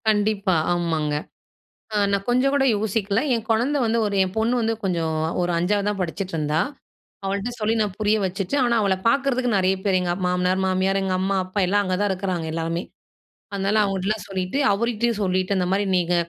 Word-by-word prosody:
கண்டிப்பா! 205 -3 +2 0.2
ஆமாங்க. 165 -4 -1 0.8
அ - - +1 0.2
நான் 200 0 0
கொஞ்ச 250 +2 +3
கூட 280 -1 +3
யோசிக்கல. 205 0 0
என் 225 -2 -2
குழந்தை 245 +6 +2
வந்து 230 0 +1
ஒரு 205 - -2
என் 185 0 -6
பொண்ணு 225 +3 +2
வந்து, 225 0 +1
கொஞ்சம் 170 -4 -1 0.3
ஒரு 175 - 0
5ஆவது 200 +4 +1
தான் 205 -2 -2
படிச்சிட்டுருந்தா. 165 -4 -1 0.7
அவள்ட்ட 200 +4 -2
சொல்லி, 215 +1 +1
நான் 205 -3 -3
புரிய 215 0 +2
வச்சுட்டு, 190 +6 -2
ஆனா 240 -1 +2
அவள 195 -2 +2
பாக்கறதுக்கு 255 -1 +1
நெறைய 190 0 +2
பேர், 195 -2 +3
எங்க 180 -1 -1
அம் 185 +1 -4
மாமனார், 180 +1 +1
மாமியார், 190 +1 +1
எங்க 190 -1 -1
அம்மா, 195 +1 0
அப்பா 185 +2 -3
எல்லாம், 205 +3 +2
அங்க 185 -1 -1
தான் 205 -1 +1
இருக்குறாங்க 185 -3 -2
எல்லாருமே. 165 +1 -2 0.7
அதுனால 200 +2 +1
அவங்கட்டலாம் 195 +2 -1
சொல்லிட்டு, 185 +5 -2
அவருகிட்டயும் 230 +1 0
சொல்லிட்டு, 185 +1 0
இந்த 180 - 0
மாதிரி 200 +1 +1
நீங்க 175 0 +1
195 Hz, 180 wpm, -23 LUFS, 185-215 Hz, 0.8 s, கொஞ்ச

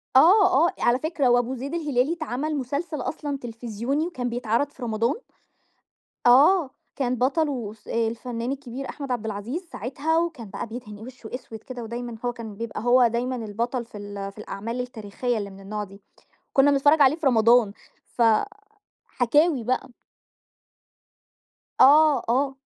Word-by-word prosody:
آه، 360 +1 +6
آه - - -3
على 240 +2 +3
فكرة 300 -4 0
وأبو 245 +1 +2
زيد 275 +5 -6
الهلالي 295 -2 +1
اتعمل 305 -1 -3
مسلسل 285 +3 -3
أصلًا 290 -3 -3
تلفزيوني 240 +5 -3
وكان 250 -8 -3
بيتعرض 235 +3 0
في 255 - -11
رمضان 230 +2 0 1.1
آه، 290 +5 +6 0.3
كان 255 -2 0
بطله 260 -4 0
أس 215 -1 -18
الفنان 230 +2 -2
الكبير 270 -1 -6
أحمد 280 -3 -6
عبد 230 -3 -2
العزيز 220 - -4
ساعتها، 280 +9 -1
وكان 310 -11 -2
بقى 230 - -5
بيدهن 215 -3 -8
وشّه 240 -1 -10
أسود 240 -3 -7
كده 250 -2 -7
ودايمًا 235 +1 -5
هو 245 - 0
كان 225 -4 -8
بيبقى 230 -1 -5
هو 245 0 +5
دايمًا 245 +3 -2
البطل 235 +2 -3
في 225 - -12
ال 205 -1 -6
في 200 - -28
الأعمال 230 +3 -5
التاريخية 240 0 -3
اللي 200 -1 -4
من 195 0 -13
النوع 210 +2 -5
دي، 200 0 -13 0.5
وكُنّا 280 +1 +4
بنتفرج 290 +2 +4
عليه 275 +2 +6
في 320 -4 -1
رمضان، 230 -3 +4 0.4
ف - - 0 0.8
حكاوي 285 +2 +2
بقى. 255 +2 -1 1.9
آه، 295 -1 +7
آه. 270 +2 +1
245 Hz, 150 wpm, -25 LUFS, 230-280 Hz, 1.9 s, آه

